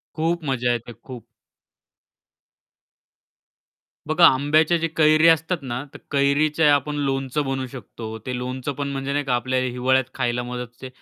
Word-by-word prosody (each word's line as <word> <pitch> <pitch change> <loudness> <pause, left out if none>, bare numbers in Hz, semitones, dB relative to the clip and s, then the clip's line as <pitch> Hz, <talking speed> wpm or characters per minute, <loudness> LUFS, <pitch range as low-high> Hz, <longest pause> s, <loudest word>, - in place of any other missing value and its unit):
खूप 165 +2 0
मजा 125 -3 0
येते, 120 0 -4
खूप. 125 -3 -10 2.8
बघा 160 +2 +5
आंब्याचे 155 +5 +3
जे 165 - 0
कैरी 155 +1 +5
असतात 165 +2 +2
ना, 130 -1 -4
तर - - -9
कैरीच्या 145 +2 +3
आपण 145 +1 -2
लोणचं 135 +2 -1
बनवू 135 -1 -2
शकतो, 115 -3 -8
ते 125 -1 -3
लोणचं 130 +3 -4
पण 140 +1 -4
म्हणजे 135 0 -3
नाही 145 0 -1
का 130 - 0
आपल्याला 130 +1 -1
हिवाळ्यात 130 +2 +2
खायला 120 -2 -1
मदत 125 0 -5
होते. 125 +2 -10
135 Hz, 145 wpm, -23 LUFS, 125-150 Hz, 2.8 s, बघा